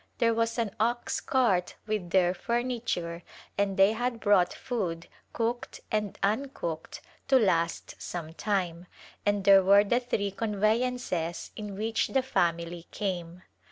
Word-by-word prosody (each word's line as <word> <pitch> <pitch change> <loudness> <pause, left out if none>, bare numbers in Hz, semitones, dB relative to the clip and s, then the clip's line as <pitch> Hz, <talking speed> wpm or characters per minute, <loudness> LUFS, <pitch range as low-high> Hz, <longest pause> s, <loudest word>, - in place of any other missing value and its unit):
There 230 -1 +3
was 230 +1 0
an 225 -4 0
ox 240 +2 0
cart 215 -10 +1
with 210 -5 -2
their 180 -1 +3
furniture 230 -7 -2 0.3
and 200 -1 0
they 195 +2 +6
had 240 +1 -2
brought 200 -5 +4
food 180 -9 -3
— - - -37
cooked 235 +1 -2
and 210 -2 -1
uncooked 200 - -2
— - - -33
to 270 -1 +6
last 170 -7 0
some 165 -2 -5
time, 180 -3 -2 0.4
and 205 -1 +2
there 195 0 +8
were 200 +2 +7
the 240 +4 +2
three 205 -5 -1
conveyances 215 -4 -1
in 205 -2 -6
which 220 +2 0
the 265 -1 +1
family 170 -5 -1
came. 180 -3 -4
205 Hz, 145 wpm, -29 LUFS, 175-230 Hz, 0.4 s, there